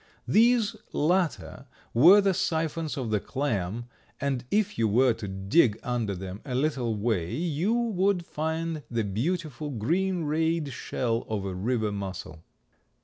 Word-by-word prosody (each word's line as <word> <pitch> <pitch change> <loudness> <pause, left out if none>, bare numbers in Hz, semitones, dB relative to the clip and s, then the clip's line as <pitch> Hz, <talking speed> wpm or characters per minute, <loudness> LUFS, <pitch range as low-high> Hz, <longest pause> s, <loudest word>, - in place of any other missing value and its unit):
These 230 -1 +4 0.2
latter 160 -4 0 0.3
were 175 - +8
the 195 -1 +2
siphons 160 -2 -1
of 120 -5 -3
the 105 - +2
clam 115 -4 -2 0.3
and 135 -3 -1
if 210 -1 +1
you 115 - +3
were 120 +4 +4
to 105 - -7
dig 105 - +2
under 115 -5 -1
them 95 +2 -7
a 130 -3 -4
little 130 -5 0
way 105 -5 -1
you 170 - 0
would 200 -6 +1
find 160 0 -3
the 115 -2 0
beautiful 150 - -2
green 170 - 0
rayed 160 -1 0
shell 115 -1 -2
of 105 -3 -2
a 95 - -3
river 110 +3 -1
mussel. 95 -5 -6
135 Hz, 145 wpm, -27 LUFS, 110-165 Hz, 0.3 s, were